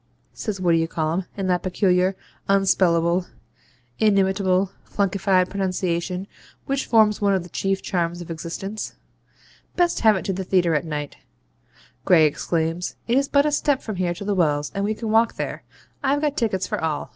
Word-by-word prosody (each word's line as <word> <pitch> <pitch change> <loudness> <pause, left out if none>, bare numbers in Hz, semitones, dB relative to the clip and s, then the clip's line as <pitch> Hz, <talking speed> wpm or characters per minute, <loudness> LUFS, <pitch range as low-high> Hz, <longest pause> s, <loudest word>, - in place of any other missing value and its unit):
says 210 -4 -4
What 180 -2 +2
d'ye 165 0 +2
call'um, 165 +3 -2
in 195 - -2
that 180 -1 +1
peculiar, 185 0 +1 0.3
unspellable, 180 -3 +3 0.7
inimitable, 195 -2 +2
flunkefied 195 -2 +1
pronunciation 185 -1 -2 0.4
which 275 0 -2
forms 215 -3 +4
one 200 -1 +3
of 185 - -1
the 175 - -12
chief 195 0 -1
charms 175 -2 -1
of 175 -1 -8
existence. 180 +6 -5 0.8
Best 350 -1 +2
have 220 -2 +5
it 190 - -4
to 195 - -1
the 190 +1 -3
theatre 180 -3 +2
at 150 +2 0
night,' 150 -2 -5 0.9
Gray 170 -5 +5
exclaims; 165 +3 -1
'it 235 - +2
is 275 +1 +2
but 280 0 +3
a 300 - +2
step 290 -2 +1
from 215 -4 -5
here 175 -1 -1
to 200 - -7
the 205 - 0
Wells, 150 -5 +1
and 200 - -2
we 215 +1 -1
can 220 0 -4
walk 225 +1 +3
there. - - -4 0.4
I've 280 +1 +1
got 295 -2 0
tickets 205 - 0
for - - -3
all. 155 -2 -2
190 Hz, 175 wpm, -23 LUFS, 175-210 Hz, 0.9 s, have